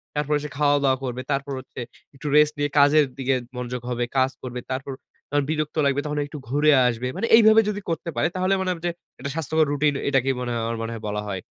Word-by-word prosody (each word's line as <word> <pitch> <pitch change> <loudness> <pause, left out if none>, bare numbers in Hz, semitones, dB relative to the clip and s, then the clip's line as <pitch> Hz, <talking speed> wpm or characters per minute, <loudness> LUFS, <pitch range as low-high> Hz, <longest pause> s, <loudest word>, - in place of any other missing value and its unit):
তারপরে 150 0 +1
সে 150 - -5
খাওয়া-দাওয়া 145 -3 +3
করবে। 125 0 -3
তারপর 140 0 -1
হচ্ছে 130 - -11 0.4
একটু 145 - -7
রেস্ট 150 0 +5
নিয়ে 145 0 +1
কাজের 145 +1 +6
দিকে 135 0 +1 0.2
মনোযোগ 125 0 -4
হবে, 120 0 -1
কাজ 130 0 +3
করবে। 125 -1 -5
তারপর 135 +1 -3 0.4
যখন 145 0 +1
বিরক্ত 155 -1 -2
লাগবে 140 +1 +2
তখন 150 0 -3
একটু 145 +1 -9
ঘুরে 150 +2 +4 0.2
আসবে। 120 +1 -2
মানে 230 - -1
এইভাবে 220 0 +7
যদি 205 0 -3
করতে 165 +1 -3
পারে - - +2
তাহলে 185 +1 +1
মনে 185 - -1
হবে 165 -2 -5
যে - - 0 0.3
এটা 140 +2 -4
স্বাস্থ্যকর 160 0 +1
রুটিন 145 0 +2 0.2
এটাকেই 135 -1 +2
মনে 125 - -3
হয় 115 - -1
আমার 115 0 -2
মনে 115 +1 -4
হয় 115 - -8
বলা 105 0 -2
হয়। 95 -2 -4
140 Hz, 225 wpm, -24 LUFS, 125-150 Hz, 0.4 s, এইভাবে